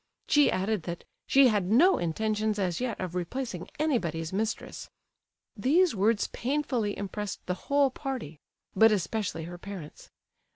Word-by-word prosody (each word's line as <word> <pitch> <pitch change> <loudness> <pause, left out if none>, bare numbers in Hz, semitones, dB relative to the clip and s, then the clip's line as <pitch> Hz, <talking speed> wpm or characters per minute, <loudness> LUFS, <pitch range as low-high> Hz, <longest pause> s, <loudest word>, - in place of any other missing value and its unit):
She 295 -1 +5
added 195 +1 0
that 170 - -5 0.2
"she 270 -1 +6
had 205 -5 0
no 335 - +5
intentions 215 +5 -1
as 185 0 -1
yet 245 -4 -2
of 180 -2 -4
replacing 180 +1 -4
anybody's 170 - -1
mistress." 215 +2 -3 0.7
These 305 - +3
words 210 +1 +2
painfully 250 -5 -1
impressed 200 0 -5
the 180 - -1 0.2
whole 280 -1 +4
party; 255 - -5 0.4
but 220 +3 +6
especially 190 -2 -1
her 175 +2 -8
parents. 185 -6 -9
210 Hz, 135 wpm, -28 LUFS, 180-255 Hz, 0.7 s, she